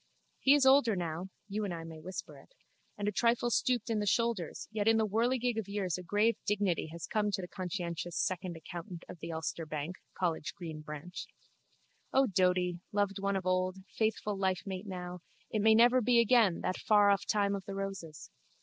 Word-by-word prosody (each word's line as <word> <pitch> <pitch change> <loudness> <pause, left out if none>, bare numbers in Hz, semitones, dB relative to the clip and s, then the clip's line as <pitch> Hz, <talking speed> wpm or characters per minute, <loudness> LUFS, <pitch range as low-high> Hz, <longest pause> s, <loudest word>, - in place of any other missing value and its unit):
He 275 +2 +6
is 285 -2 +3
older 265 -5 +6
now 175 +1 -3 0.2
(you 210 +1 -2
and 200 - -2
I 165 -1 -5
may 165 -1 -9
whisper 185 +4 -7
it) - - -21 0.4
and 205 0 -2
a - - +2
trifle 235 +3 +2
stooped 240 +1 +1
in 225 -2 0
the 205 - -1
shoulders 230 -7 0
yet 215 -1 -1
in 225 0 +6
the 220 - +3
whirligig 235 +2 +1
of 210 - -5
years 195 -4 -1
a 185 - -5
grave 205 +5 +2
dignity 200 -6 +1
has 165 +1 -7
come 210 -1 0
to 200 - -1
the 180 - -5
conscientious 175 -2 -4
second 185 -2 -1
accountant 170 +2 -8
of 180 - -10
the 165 +1 -6
Ulster 160 +1 -3
bank, 155 +4 -4 0.2
College 165 -5 -1
Green 160 -4 -7
branch. 150 +3 -7 0.8
O 270 0 +4
Doady, 180 -4 +2
loved 205 -1 0
one 200 0 0
of 190 -1 -2
old, 185 0 +1 0.2
faithful 215 -1 0
lifemate 190 +1 -2
now, 180 -1 -5 0.3
it 215 - 0
may 220 +1 +6
never 240 +3 +6
be 240 +1 +4
again, 230 -6 +4
that 185 - -1
faroff 205 -2 +4
time 200 -2 +2
of 195 -1 -4
the 195 - -5
roses! 195 -6 -6
195 Hz, 195 wpm, -32 LUFS, 180-220 Hz, 0.8 s, He